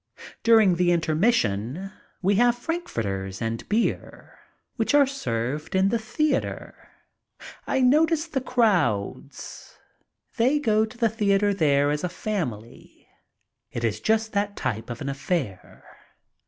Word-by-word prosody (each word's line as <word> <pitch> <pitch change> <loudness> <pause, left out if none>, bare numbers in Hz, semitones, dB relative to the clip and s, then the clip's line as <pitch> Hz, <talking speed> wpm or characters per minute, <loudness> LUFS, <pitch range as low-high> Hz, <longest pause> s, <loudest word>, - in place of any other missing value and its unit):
During 220 -6 +5
the 175 0 +3
intermission 160 - 0 0.3
we 195 +3 +3
have 240 +1 +4
frankfurters 100 - -4
and 115 0 -4
beer, 220 +3 -2 0.4
which - - +1
are 285 -1 +6
served 145 - -3
in 190 +1 +3
the 235 - 0
theater. 270 +8 -2 0.9
I 265 - +1
notice 310 +5 +3
the 290 -5 -3
crowds. 180 - -1 0.6
They 255 +6 +3
go 220 -6 +2
to 220 +2 -13
the 230 -1 +3
theater 205 -2 +1
there 145 -5 +2
as 150 0 -2
a 180 - -1
fam 180 - -2
ily. 110 +2 -15 0.6
It 120 - -5
is 110 -2 -1
just 220 - 0
that 205 0 -1
type 115 -3 -3
of 120 - -6
an 140 - -3
affair. 135 - -4
195 Hz, 130 wpm, -25 LUFS, -, 0.9 s, are